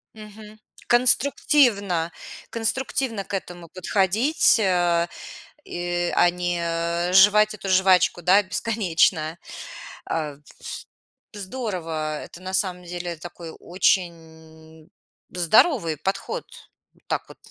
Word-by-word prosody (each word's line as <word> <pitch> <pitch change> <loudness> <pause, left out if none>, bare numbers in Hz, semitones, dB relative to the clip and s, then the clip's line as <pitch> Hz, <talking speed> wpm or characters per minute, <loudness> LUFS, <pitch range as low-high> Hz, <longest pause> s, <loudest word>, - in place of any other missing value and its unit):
Мгм. 215 0 -13 0.3
Конструктивно 240 - +3 0.4
конструктивно 230 -1 -1
к 195 - -11
этому 175 -3 -6
подходить, 210 - +2
а 175 -3 +2 0.6
и, 175 0 -3
а, 175 - +5
не 175 0 -2
э 170 +1 -1
жевать 210 +3 +6
эту 200 -2 -6
жвачку, 185 -1 +3
да, 190 +4 +5
бесконечно. 180 -5 0 0.7
А, 150 -3 -3
вс 145 - -27 0.9
здорово. 180 -8 -4
Это 175 - -13
на 185 0 -7
самом 185 -2 -1
деле 175 -1 -6
такой 170 0 -10
очень 160 -3 -3 0.4
здоровый 180 - +2
подход, 190 +7 -3 0.6
так - - -2
вот, - - -14
180 Hz, 100 wpm, -23 LUFS, 170-210 Hz, 0.9 s, жевать